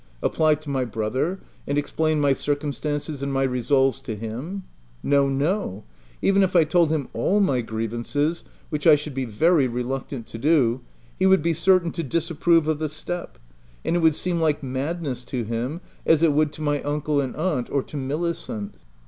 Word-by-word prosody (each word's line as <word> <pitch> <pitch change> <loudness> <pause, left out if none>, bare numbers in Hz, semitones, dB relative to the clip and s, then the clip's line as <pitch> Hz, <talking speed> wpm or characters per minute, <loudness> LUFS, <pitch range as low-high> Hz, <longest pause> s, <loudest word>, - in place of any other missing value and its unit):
Apply 155 -1 +3
to 155 0 -10
my 135 -2 +1
brother, 125 - -2 0.3
and 140 - 0
explain 155 +1 0
my 140 -2 +4
circumstances 145 +1 -2
and 140 0 -2
my 135 0 +1
resolves 135 +1 +2
to 120 -5 -5
him? 125 - -5 0.4
No, 140 -1 +3
no; 140 - -1 0.4
even 195 0 +4
if 190 -1 +1
I 170 - +7
told 165 +1 +3
him 155 -4 -1
all 205 +3 +2
my 140 -11 +2
grievances, 120 +8 -2 0.3
which 150 +1 0
I 155 - +9
should 150 0 -5
be 130 0 -2
very 140 +6 +3
reluctant 125 0 -4
to 115 - -9
do, 130 -4 +3 0.4
he 190 - +4
would 190 -5 +5
be 170 0 +2
certain 170 +1 +3
to 170 - -3
disapprove 165 +1 +1
of 155 -1 0
the 155 -1 -1
step: 175 +3 -6 0.5
it 175 +1 +1
would 160 -2 +4
seem 175 0 -1
like 150 -2 +1
madness 135 0 -3
to 125 -3 -3
him, 120 - -3 0.2
as 160 0 +4
it 160 -3 +5
would 150 0 +2
to 155 - -7
my 145 -1 0
uncle 145 0 0
and 130 -2 -4
aunt, 155 -7 -1
or 140 -2 0
to - - -12
Milicent. 140 -6 -3
145 Hz, 180 wpm, -24 LUFS, 130-165 Hz, 0.5 s, I